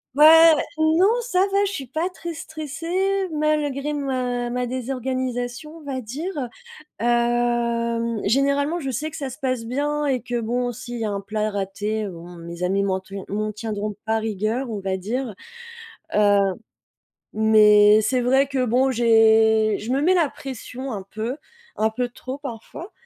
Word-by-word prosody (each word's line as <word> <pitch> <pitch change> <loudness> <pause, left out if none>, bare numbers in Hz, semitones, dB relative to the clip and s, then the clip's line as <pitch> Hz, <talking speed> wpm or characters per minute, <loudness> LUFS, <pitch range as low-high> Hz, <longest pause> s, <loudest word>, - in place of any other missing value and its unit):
Ouais, 295 - +5 0.3
ouais, - - 0 0.2
non, 315 +3 +4 0.2
ça 390 -6 +1
va, 400 +1 +3
je 395 - -2
suis 280 -9 -5
pas 320 +8 -2
très 340 -2 -7
stressée, 330 +5 -2
malgré 300 -2 0
ma 255 -4 -2
ma 250 +1 -1
désorganisation, 255 +2 -3
on 320 - -14
va 270 -2 -4
dire, 275 - -4 0.5
hem, 235 -1 +1
généralement, 280 +6 +2
je 275 -5 -3
sais 295 +6 -3
que - - -9
ça 275 -4 -4
se 255 - -10
passe 255 -3 -2
bien 290 +5 -1
et 265 -3 +1
que 245 +1 -3
bon, 245 +2 -1
s'il 240 +1 -7
y 225 - -2
a - - -2
un 200 -1 -3
plat 215 +1 -2
raté, 205 +2 -3
bon, 175 -1 -10
mes 170 +1 -8
amis 195 +2 +1
m'en 190 -1 0
tian 195 0 -8
m'en 215 +1 -2
tiendront 210 -1 -4
pas 220 0 +1
rigueur, 220 +4 -2
on 210 -2 -4
va 190 -1 -2
dire, 230 +4 -3 0.8
heu, 205 -1 +4 1.0
mais 210 -1 +6
c'est 245 +4 +1
vrai 265 +3 +3
que 265 -2 0
bon, 250 +3 +2
j'ai 220 -2 +4
je 220 - -5
me 270 - +1
mets 350 +6 +3
la 330 -6 +2
pression 260 0 -7
un 200 -3 -4
peu, 225 +5 -3 0.4
un 220 +1 +2
peu 245 +2 -2
trop 255 +2 -7
parfois, 285 - -8
245 Hz, 170 wpm, -23 LUFS, 220-280 Hz, 1.0 s, mais